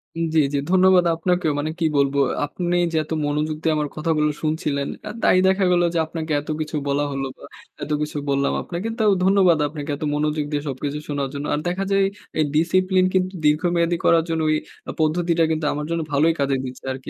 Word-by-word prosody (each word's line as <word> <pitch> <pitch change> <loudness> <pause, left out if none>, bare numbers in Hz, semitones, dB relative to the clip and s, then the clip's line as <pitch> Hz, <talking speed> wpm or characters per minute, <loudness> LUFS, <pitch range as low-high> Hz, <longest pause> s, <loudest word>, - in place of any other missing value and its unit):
উ - - -5
জ্বী, 160 - +5
জ্বী। - - +1
ধন্যবাদ 185 -1 +5
আপনাকেও। 175 -1 0
মানে 155 +2 -2
কি 165 - +1
বলবো? 140 0 +2
আ - - -2
আপনি 175 +4 -2 0.2
যে 160 - -1
এত 155 - -17
মনোযোগ 150 +1 -1
দিয়ে 160 - +1
আমার 150 -1 -1
কথাগুলো 155 -1 +1
শুনছিলেন। 155 -3 -1 0.2
এ - - -4
তাই 185 - +4
দেখা 190 +1 +2
গেল 175 0 +3
যে 165 - +1
আপনাকে 160 -1 -5
এত 150 - -13
কিছু 155 +1 -4
বলা 140 +1 +1
হলো 135 0 -3
বা - - -17 0.4
এত 150 - -5
কিছু 150 0 -3
বললাম 140 0 +1
আপনাকেও। 195 +6 -4
তাও 215 -2 +4
ধন্যবাদ 190 -3 +4
আপনাকে 150 0 -7
এত 145 - -7
মনোযোগ 150 0 0
দিয়ে 145 -1 -1
সবকিছু 140 +2 -4
শোনার 140 -2 -1
জন্য। 140 +1 -4
আর 150 - 0
দেখা 185 +2 -1
যায় 195 0 +3 0.4
এই 155 - +3
ডিসিপ্লিন 185 +3 +3
কিন্তু 185 0 +1
দীর্ঘমেয়াদী 170 +3 +2
করার 165 -1 +5
জন্য 165 -1 0
ওই 155 - +3 0.3
আ - - -1
পদ্ধতিটা 165 +1 +2
কিন্তু 155 -1 -1
আমার 150 0 -4
জন্য 170 0 -1
ভালোই 155 +4 +3
কাজে 140 -1 +1
দিচ্ছে 130 0 -8
আরকি। 130 0 -9
155 Hz, 210 wpm, -22 LUFS, 145-175 Hz, 0.4 s, জ্বী